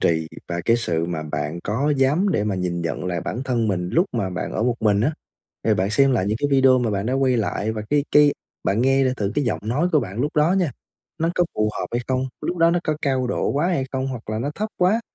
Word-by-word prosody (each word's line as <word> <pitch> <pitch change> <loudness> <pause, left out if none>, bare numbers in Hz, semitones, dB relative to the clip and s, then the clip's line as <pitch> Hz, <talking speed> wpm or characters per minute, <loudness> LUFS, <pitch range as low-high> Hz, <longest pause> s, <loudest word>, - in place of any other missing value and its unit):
trì 80 -1 +1 0.2
và 85 0 -2
cái 115 - +4
sự 85 -8 -1
mà 85 -2 -3
bạn 75 +2 -3
có 125 +9 0
dám 145 +9 +2
để 105 - +1
mà 105 - -1
nhìn 90 -2 -2
nhận 85 +1 -3
lại 90 -2 -2
bản 120 - -4
thân 120 -4 0
mình 90 -2 -1
lúc 175 +5 +3
mà 100 -6 -1
bạn 90 0 -4
ở 110 - -1
một 120 -1 +2
mình 105 -2 +3
á, 145 +9 +2 0.5
thì - - +3
bạn 95 +2 0
xem 135 +5 +4
lại 105 -7 +1
những 105 +2 0
cái 145 - 0
video 130 -1 +5
mà 120 -2 0
bạn 100 0 -1
đã 125 - 0
quay 130 -2 +2
lại 110 0 -1
và 110 -1 -4
cái 145 -1 +2
cái 150 -1 +6 0.3
bạn 105 +4 +1
nghe 135 +1 +3
lại 130 -1 +1
thử 100 -1 -1
cái 145 - +2
giọng 115 - -1
nói 135 +11 +1
của 155 - +4
bạn 105 -1 -5
lúc 145 +4 -1
đó 150 +4 +4
nha, 180 -7 +1 0.5
nó 165 0 +1
có 175 - +4
phù 110 0 +1
hợp - - -2
hay 120 - -1
không? 130 0 0
Lúc 175 - -2
đó 165 0 +5
nó 175 - +2
có 155 - 0
cao 130 -3 0
độ 125 - -1
quá 150 +5 +1
hay 170 -8 0
không? 130 0 -2
Hoặc 125 -5 -6
là 110 0 -2
nó 140 +5 -2
thấp 215 +1 -2
quá, 190 +6 +3
125 Hz, 275 wpm, -22 LUFS, 100-145 Hz, 0.5 s, cái